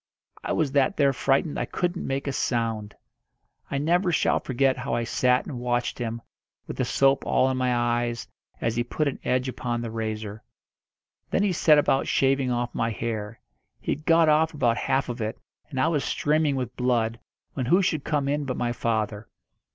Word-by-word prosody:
I -, -, -3 dB
was 155 Hz, -4 st, +1 dB
that 145 Hz, +8 st, +2 dB
there 140 Hz, -2 st, +4 dB
frightened 135 Hz, +3 st, +1 dB
I -, -, -1 dB
couldn't 180 Hz, 0 st, -2 dB
make 135 Hz, +1 st, -2 dB
a 140 Hz, -, -2 dB
sound. 115 Hz, -5 st, -1 dB, 0.7 s
I 140 Hz, -, -1 dB
never 175 Hz, +5 st, +2 dB
shall -, -, +2 dB
forget 130 Hz, +1 st, +1 dB
how 125 Hz, -, -2 dB
I 120 Hz, -, 0 dB
sat 125 Hz, +2 st, +2 dB
and 125 Hz, -, -6 dB
watched 120 Hz, 0 st, -1 dB
him, 115 Hz, -1 st, -4 dB, 0.4 s
with -, -, -7 dB
the -, -, +1 dB
soap 135 Hz, 0 st, +3 dB
all 130 Hz, -, +2 dB
in 130 Hz, -, -2 dB
my 125 Hz, -1 st, +1 dB
eyes, 120 Hz, 0 st, 0 dB, 0.3 s
as 115 Hz, 0 st, -1 dB
he 120 Hz, -, +1 dB
put 150 Hz, +5 st, -1 dB
an 140 Hz, -, -3 dB
edge 130 Hz, +1 st, 0 dB
upon 120 Hz, -1 st, -3 dB
the 115 Hz, -1 st, -4 dB
razor. 110 Hz, -1 st, -4 dB, 0.9 s
Then 200 Hz, -, +1 dB
he 200 Hz, -3 st, +2 dB
set 155 Hz, -2 st, +5 dB
about 140 Hz, -2 st, +2 dB
shaving 135 Hz, -1 st, +2 dB
off 120 Hz, 0 st, -1 dB
my 115 Hz, -, 0 dB
hair. 110 Hz, -1 st, -4 dB, 0.4 s
He -, -, -3 dB
had 150 Hz, -, -4 dB
got 165 Hz, -1 st, +5 dB
off 155 Hz, +1 st, +3 dB
about 120 Hz, -4 st, +2 dB
half 135 Hz, +2 st, 0 dB
of 120 Hz, -1 st, -5 dB
it, 110 Hz, 0 st, -3 dB, 0.3 s
and 135 Hz, -4 st, -4 dB
I 130 Hz, -, +3 dB
was 150 Hz, -4 st, +1 dB
streaming 150 Hz, -1 st, +1 dB
with 125 Hz, -2 st, -4 dB
blood, 120 Hz, -2 st, 0 dB, 0.3 s
when 130 Hz, -3 st, -3 dB
who 180 Hz, +8 st, +4 dB
should 155 Hz, -6 st, 0 dB
come 145 Hz, -3 st, 0 dB
in 145 Hz, +1 st, 0 dB
but 130 Hz, -2 st, -3 dB
my 120 Hz, -1 st, 0 dB
father. 110 Hz, -2 st, -2 dB
130 Hz, 195 wpm, -26 LUFS, 115-145 Hz, 0.9 s, set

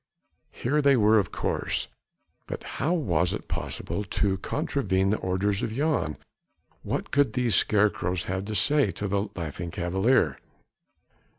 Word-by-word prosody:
Here 145 Hz, +5 st, 0 dB
they 140 Hz, -2 st, +5 dB
were 110 Hz, 0 st, +5 dB
of 95 Hz, -, -2 dB
course, -, -, -1 dB, 0.6 s
but -, -, -5 dB
how 150 Hz, +7 st, -2 dB
was 90 Hz, -, +1 dB
it -, -, -8 dB
possible 85 Hz, +5 st, -3 dB
to 100 Hz, -1 st, 0 dB
contravene 100 Hz, -, 0 dB
the 105 Hz, -, +1 dB
orders 95 Hz, +2 st, 0 dB
of 110 Hz, -, -2 dB
Jan? 140 Hz, -, 0 dB, 0.6 s
What -, -, -3 dB
could 140 Hz, -1 st, +3 dB
these 125 Hz, -3 st, +1 dB
scarecrows 95 Hz, -4 st, +2 dB
have 95 Hz, +4 st, -3 dB
to 110 Hz, +1 st, -4 dB
say 135 Hz, +5 st, +3 dB
to 100 Hz, +3 st, -4 dB
the 100 Hz, +1 st, -1 dB
Laughing 85 Hz, 0 st, -5 dB
Cavalier? 90 Hz, -, +1 dB
100 Hz, 140 wpm, -27 LUFS, 90-125 Hz, 0.6 s, they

